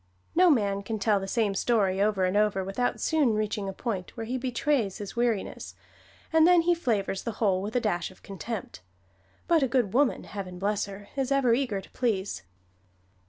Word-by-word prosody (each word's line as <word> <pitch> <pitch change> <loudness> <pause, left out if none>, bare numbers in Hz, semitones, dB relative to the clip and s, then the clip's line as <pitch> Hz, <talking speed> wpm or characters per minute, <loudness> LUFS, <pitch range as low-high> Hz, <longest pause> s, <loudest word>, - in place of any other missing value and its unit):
No 360 +1 +5
man 200 -8 +2
can 220 +2 -4
tell 205 0 +2
the 195 - -5
same 210 -1 +1
story 195 -3 +1
over 205 -2 +2
and 185 +2 0
over 210 -2 +2
without 195 +6 -1
soon 290 -9 +2
reaching 210 -2 -2
a - - -3
point 195 -2 -5
where 225 - -4
he 245 +3 -3
betrays 250 -4 0
his 205 -2 -7
weariness, 235 -4 -2 0.6
and 320 0 +6
then 355 -1 +6
he 350 +1 +3
flavors 220 - -1
the 230 - -4
whole 195 -5 +1
with 210 +4 -5
a - - +4
dash 190 -7 -1
of 185 - -19
contempt; 200 - -6 0.7
but 335 -2 +4
a 265 - +3
good 240 -6 +1
woman, 275 +1 +2
heaven 185 -3 -7
bless 200 +2 0
her! 200 +1 -10
is 270 -1 -1
ever 270 -4 +3
eager 235 -6 0
to - - -16
please. 205 - -1
215 Hz, 195 wpm, -27 LUFS, 195-250 Hz, 0.7 s, and